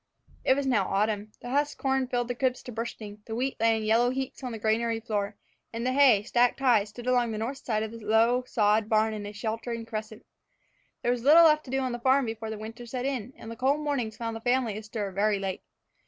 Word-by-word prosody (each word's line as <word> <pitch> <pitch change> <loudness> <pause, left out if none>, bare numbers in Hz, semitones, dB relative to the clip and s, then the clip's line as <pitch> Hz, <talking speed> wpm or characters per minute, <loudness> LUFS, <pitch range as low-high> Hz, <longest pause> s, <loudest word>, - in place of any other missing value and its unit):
It 260 - +4
was 280 0 -1
now 220 -8 +2
autumn. 210 +1 -1
The 245 - -6
husked 290 +2 0
corn 265 -1 +1
filled 245 -1 -1
the 245 - -2
cribs 255 0 -1
to 245 - -8
bursting, 215 -2 -6
the 220 - -4
wheat 260 +3 -2
lay 225 0 +3
in 220 - -4
yellow 230 +3 +3
heaps 265 +1 -4
on 250 - -3
the 225 - -5
granary 225 +1 0
floor, 210 -2 -3 0.4
and 230 +1 -4
the 255 - +1
hay, 260 -7 +5
stacked 245 +3 +2
high, 240 -6 +4
stood 215 +3 -11
along 245 -2 +2
the 215 - -4
north 245 +6 -3
side 215 -5 -1
of 220 - -5
the 230 - -9
low, 225 +4 +3
sod 210 0 +2
barn 220 0 +2
in 205 -1 -5
a - - -6
sheltering 230 +2 -4
crescent. 220 -1 -6 0.8
There 240 - +2
was 245 -1 -1
little 310 +5 +8
left 305 -1 +4
to - - -11
do 270 0 0
on 255 -1 -1
the 240 - -4
farm 265 +2 +3
before 225 -1 -5
the 220 - -5
winter 225 +3 -8
set 250 +1 -4
in, 260 -2 -3
and 225 - -9
the - - -6
cold 270 +5 +1
mornings 260 -7 -2
found 230 -1 -4
the 225 - -7
family 245 -3 +1
astir 215 -1 -5
very 205 +2 +1
late. 195 -1 -4
230 Hz, 245 wpm, -28 LUFS, 215-255 Hz, 0.8 s, little